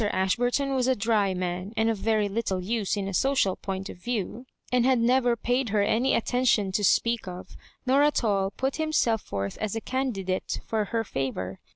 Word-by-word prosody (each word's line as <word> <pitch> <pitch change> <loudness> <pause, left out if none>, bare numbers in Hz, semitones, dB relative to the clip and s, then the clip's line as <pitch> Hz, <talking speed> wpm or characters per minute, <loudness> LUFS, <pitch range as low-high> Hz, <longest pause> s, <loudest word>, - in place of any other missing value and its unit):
Ashburton 245 +9 +1
was 255 -1 +1
a 260 - +3
dry 205 -3 +1
man, 180 +3 -3
and 220 0 +2
of 225 -3 0
very 215 -1 +1
little 200 -2 -1
xme 205 +2 -1
in 195 -1 -2
a 195 - -4
social 255 -5 +2
point 195 0 -5
of - - -9
view, 235 +4 -4 0.2
and 250 -1 +3
had 260 0 +4
never 245 +1 +3
paid 245 +2 0
her 205 0 +2
any 230 +5 +2
attention 235 -5 +2
to 205 +2 0
speak 230 +2 +2
of, 180 0 -8 0.3
nor 265 +2 +4
at 295 -3 +2
all 195 -3 +1
put 265 +6 -2
him 315 -1 -2
self 225 -7 +2
forth 100 -1 -4
as 215 0 -2
a - - -1
candidate 210 -8 -2
for 220 -2 -1
her 225 +2 -1
favour. 125 - -4
220 Hz, 200 wpm, -27 LUFS, 195-245 Hz, 0.3 s, had